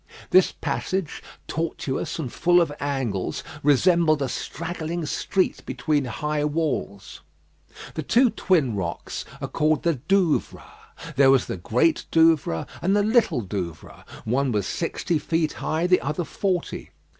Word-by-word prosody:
This 185 0 +6
passage, 185 -5 -3 0.3
tortuous 160 -4 -3
and 140 -7 -5
full 175 +1 +4
of 165 -4 +1
angles, 130 -9 -2 0.2
resembled 155 +1 +3
a 135 - -2
straggling 165 +3 -4
street 185 +5 -1
between 150 -3 -1
high 150 +5 -2
walls. 150 -10 -2 0.7
The 160 - -3
two 240 - +3
twin 160 - +1
rocks 85 -4 -4 0.2
are - - -2
called 155 0 +1
the 170 - +3
Douvres. 190 -5 +1 0.5
There 135 -1 +6
was 135 -2 +4
the - - -4
Great 125 - +1
Douvre 160 - +3 0.2
and 190 +3 +2
the 205 - +3
Little 220 - +2
Douvre; 90 -6 -6 0.2
one 130 +4 +1
was 105 -4 0
sixty 165 - -1
feet 160 -1 0
high, 160 +2 0
the 180 0 +4
other 150 +5 -2
forty. 180 +1 -2
155 Hz, 135 wpm, -24 LUFS, 135-175 Hz, 0.7 s, This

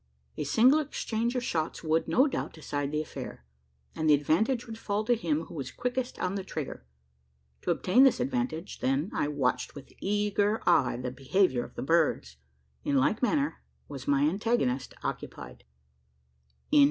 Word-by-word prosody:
A 150 - -3
single 250 - +5
exchange 240 -5 -2
of 250 - 0
shots 160 -7 -2
would, 160 0 +1
no 265 - +4
doubt 290 - -3
decide 145 -2 -3
the 150 0 0
affair; 65 - -8 0.5
and 155 0 0
the 150 - +8
advantage 220 - +1
would 225 -1 -8
fall 205 0 -1
to 240 - +4
him 165 -8 0
who - - -11
was 135 -5 -4
"quickest 250 +1 -3
on 185 - -1
the 195 -1 -3
trigger." 150 - -6 0.7
To - - -4
obtain 245 +9 +4
this 270 - +5
advantage, 250 - -2
then, 135 +8 0
I - - 0
watched 130 -4 -1
with 140 - -11
eager 205 +1 +1
eye 125 -3 +4
the 125 0 -4
behaviour 135 0 +1
of - - -12
the - - -4
birds. 145 - +1 0.5
In 140 - +1
like 170 - +2
manner 285 +3 +1 0.3
was 135 -2 -8
my 140 0 +3
antagonist, 160 - 0
occupied. - - -6
165 Hz, 165 wpm, -29 LUFS, 140-230 Hz, 0.7 s, the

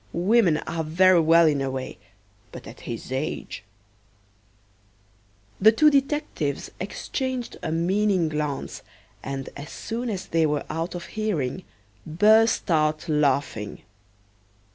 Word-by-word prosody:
Women 185 -2 +3
are 165 -1 -3
very 180 +3 +4
well 165 +1 +5
in 145 -3 +2
a 135 - -1
way, 130 0 -6 0.5
but - - -10
at - - -11
his 115 +2 -6
age 130 -5 -4 0.9
" 100 0 -35
The 215 +3 +8
two 300 +7 +5
detectives 275 - -1
exchanged 255 +6 -4
a - - -3
meaning 185 +2 +1
glance, 150 -2 -4 0.4
and 135 0 -5
as 145 +1 -8
soon 235 +2 -5
as 195 -4 -4
they 165 -1 +1
were 150 -1 -2
out 165 +3 -3
of 175 - -6
hearing 190 - -2 0.4
burst 215 - +3
out 155 0 +1
laughing. 140 -8 0
160 Hz, 125 wpm, -24 LUFS, 135-205 Hz, 0.9 s, The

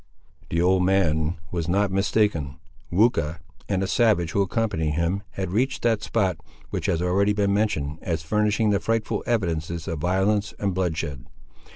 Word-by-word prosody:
The 85 - 0
old 90 0 +3
man 85 -4 +2 0.2
was 85 -2 -2
not 100 +2 +1
mistaken. 95 -8 +1 0.4
Weucha, 85 -6 +2 0.3
and 95 -1 +1
a - - -1
savage 105 -7 +2
who 100 - +1
accompanied 95 -6 0
him, 85 +4 0
had 95 -2 -3
reached 130 +7 0
that 115 -3 +2
spot, 95 -6 0 0.3
which - - -2
has 85 +1 +1
already 100 +3 +2
been 100 -1 +1
mentioned 85 -8 0
as 80 -2 -2
furnishing 105 +4 +1
the 100 - +2
frightful 115 -1 -1
evidences 85 -7 -1
of 80 - -3
violence 95 +5 +1
and 100 -2 -1
bloodshed. 80 -7 -2
95 Hz, 160 wpm, -24 LUFS, 85-105 Hz, 0.4 s, old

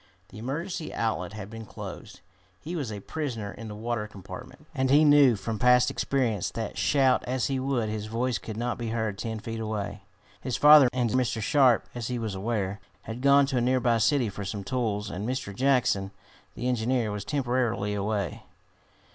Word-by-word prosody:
The 105 - -11
emergency 160 - -4
outlet 100 -5 -2
had 105 -2 -7
been 115 0 -7
closed! - - -9 0.4
He 170 +3 -6
was 140 -9 -3
a 105 -1 -6
prisoner 115 -8 -4
in 110 +4 -9
the 105 - -7
water 110 0 -3
compartment, 120 +8 -11
and 130 -3 0
he 150 +3 +6
knew, 145 -5 +6
from 110 +1 -4
past 125 0 +5
experience, 120 -8 0
that 110 -2 -5
shout 135 -3 +3
as 125 0 0
he 135 -1 0
would, 130 -4 0
his 105 0 -4
voice 115 +1 -1
could 110 -1 -7
not 120 +1 -2
be 120 - -3
heard 110 -3 -2
ten 110 -1 -3
feet 115 +1 -5
away. 105 -2 -4 0.4
His 130 - -2
father 150 -3 +8
and 125 -3 0
Mr. 125 -3 +1
Sharp, 130 +1 +3
as 120 -2 -4
he 125 - -2
was 110 -3 -3
aware, 100 -1 -2 0.2
had 115 +2 -6
gone 140 +1 +6
to 135 -2 -2
a - - +2
nearby 120 -2 +2
city 130 +1 +3
for 100 0 -6
some 100 +1 -4
tools, 105 -2 -2
and 100 +6 -4
Mr. 130 -6 -3
Jackson, 125 -6 +2 0.5
the 125 - -3
engineer, 120 -2 0
was 105 -1 -4
temporarily 120 -7 0
away. 100 -4 -2
115 Hz, 190 wpm, -27 LUFS, 105-130 Hz, 0.5 s, father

